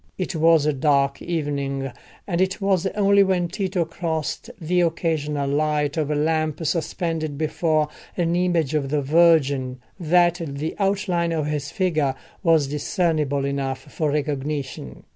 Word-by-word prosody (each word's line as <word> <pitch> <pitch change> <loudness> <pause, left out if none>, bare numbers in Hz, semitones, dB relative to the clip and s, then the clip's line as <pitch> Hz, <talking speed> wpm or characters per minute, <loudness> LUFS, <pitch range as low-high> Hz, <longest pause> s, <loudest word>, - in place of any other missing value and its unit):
It 185 0 -3
was 160 -1 +4
a 150 - +2
dark 140 0 +1
evening, 140 -5 -2 0.3
and 175 -2 -1
it 190 +1 0
was 195 -2 +1
only 200 -1 +4
when 185 -3 +2
Tito 185 -4 -1
crossed 160 -2 -3
the 175 +2 +1
occasional 155 -4 0
light 150 0 0
of 155 -3 -1
a 150 - 0
lamp 155 +1 0
suspended 165 -2 -2
before 155 0 +1 0.3
an 170 -1 +1
image 175 -5 +1
of 145 -3 0
the 145 0 0
Virgin, 140 -4 +3 0.2
that 175 +1 +3
the 145 +1 -4
outline 190 -4 0
of 155 -3 -1
his 150 -2 -2
figure 155 -9 0 0.3
was 165 -5 +4
discernible 150 -1 0
enough 135 -1 -2
for 155 -2 0
recognition. 140 - -3
155 Hz, 145 wpm, -23 LUFS, 145-175 Hz, 0.3 s, was